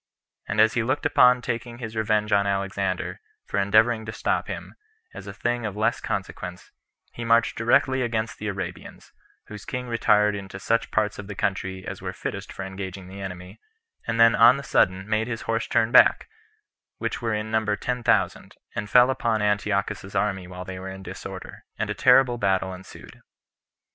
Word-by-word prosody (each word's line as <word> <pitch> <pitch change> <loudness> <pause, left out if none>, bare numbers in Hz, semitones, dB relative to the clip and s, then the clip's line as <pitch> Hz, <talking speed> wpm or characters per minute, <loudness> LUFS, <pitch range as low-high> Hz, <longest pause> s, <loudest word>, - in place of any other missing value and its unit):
And 100 - -2
as 110 0 +5
he 120 - +1
looked 130 +5 -1
upon 125 0 +5
taking 120 +1 -4
his 110 -2 -7
revenge 110 -1 0
on 100 0 +3
Alexander, 100 -1 -2 0.2
for - - -2
endeavoring 110 +3 +3
to - - -3
stop - - -1
him, - - -7 0.4
as - - -10
a - - -5
thing 120 +4 -2
of 105 -2 -4
less 110 - +1
consequence, 90 -1 -5 0.4
he 120 - -6
marched 115 0 +3
directly 130 +3 +2
against 115 -2 -2
the 105 - -4
Arabians, 100 -2 -7 0.3
whose 105 -1 -10
king 125 -1 -5
retired 105 -3 +3
into 95 -1 -7
such 115 +3 0
parts 105 -1 0
of 100 - -7
the 105 - -7
country 95 -1 -2
as - - -6
were - - -5
fittest - - -6
for 95 - -6
engaging 95 -1 -7
the 100 +1 -9
enemy, 90 +1 -8 0.5
and 115 0 -1
then 115 0 +7
on 120 +4 +7
the 140 - -6
sudden 95 -5 +1
made 110 +1 0
his 115 -2 -4
horse 115 0 -1
turn 110 +1 +1
back, - - +6 0.7
which - - -3
were 115 -2 0
in 105 +1 -4
number 110 -1 +1
ten 125 +4 -3
thousand, - - 0 0.2
and 105 - -4
fell 125 +3 +6
upon 115 -4 0
Antiochus's 105 -1 -1
army 95 -2 -1
while 90 0 -8
they 95 0 -7
were 95 +1 -6
in 95 0 -9
disorder, - - -9
and - - -2
a - - 0
terrible 125 -3 +4
battle 95 -2 0
ensued. 90 +1 -13
105 Hz, 185 wpm, -25 LUFS, 95-115 Hz, 0.7 s, then